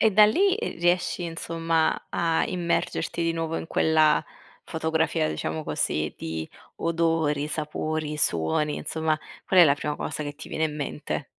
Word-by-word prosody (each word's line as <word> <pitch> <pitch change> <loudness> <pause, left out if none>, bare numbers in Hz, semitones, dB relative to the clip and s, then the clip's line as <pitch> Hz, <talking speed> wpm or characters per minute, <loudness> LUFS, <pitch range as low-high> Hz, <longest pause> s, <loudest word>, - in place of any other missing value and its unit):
E 220 - +5
da 210 +1 +7
lì, 380 - +3
ehm, 455 - -4
riesci 175 0 +1
insomma 165 -1 -1
a 165 -1 +1
immergerti 170 -1 -1
di 165 - +1
nuovo 165 0 -2
in - - -4
quella 155 -1 +3 0.4
fotografia, 160 - 0
diciamo 80 +1 -3
così, 75 0 -1
di 80 0 -5 0.3
odori, 165 -3 +1
sapori, 155 0 -3
suoni, 85 - +1
insomma, 160 -1 -1 0.3
qual 185 -2 +6
è - - +10
la 140 -3 +5
prima 150 0 -3
cosa 150 +1 -4
che 145 - -5
ti 155 - -10
viene 160 - -1
in 150 -1 -2
mente? 145 0 -4
160 Hz, 160 wpm, -26 LUFS, 150-165 Hz, 0.4 s, è